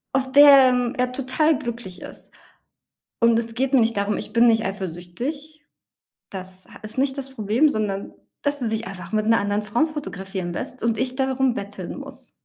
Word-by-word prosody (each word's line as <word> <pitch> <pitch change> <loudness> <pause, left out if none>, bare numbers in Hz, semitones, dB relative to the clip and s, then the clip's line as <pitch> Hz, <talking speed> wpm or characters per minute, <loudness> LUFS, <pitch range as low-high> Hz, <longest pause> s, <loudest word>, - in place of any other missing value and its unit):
Auf 260 -1 0
der, 275 -2 +8
ähm, 250 0 0
er 250 0 0
total 275 +3 +1
glücklich 235 -8 -7
ist. - - -10 0.9
Und 230 0 +5
es 230 0 -2
geht 265 +3 -1
mir 255 - +6
nicht 225 -1 +1
darum, 200 +1 0
ich - - -4
bin 235 +2 +5
nicht 225 -1 +3
eifersüchtig. 210 - -5 0.7
Das 185 -1 -8
ha - - -14
ist 215 +2 -6
nicht 270 +1 +1
das 270 -1 -5
Problem, 235 +4 +2
sondern 205 -6 -3 0.3
dass 285 0 0
er 235 - -1
sich 220 +1 -1
einfach 180 -2 -9
mit 215 0 0
'ner 225 - +4
anderen 205 +1 -1
Frau 215 +9 +1
fotografieren 195 - -5
lässt 250 +8 -5
und 230 -1 0
ich 255 +2 -1
darum 265 -1 +1
betteln 200 +2 -6
muss. 270 -2 -11
235 Hz, 190 wpm, -23 LUFS, 205-265 Hz, 0.9 s, der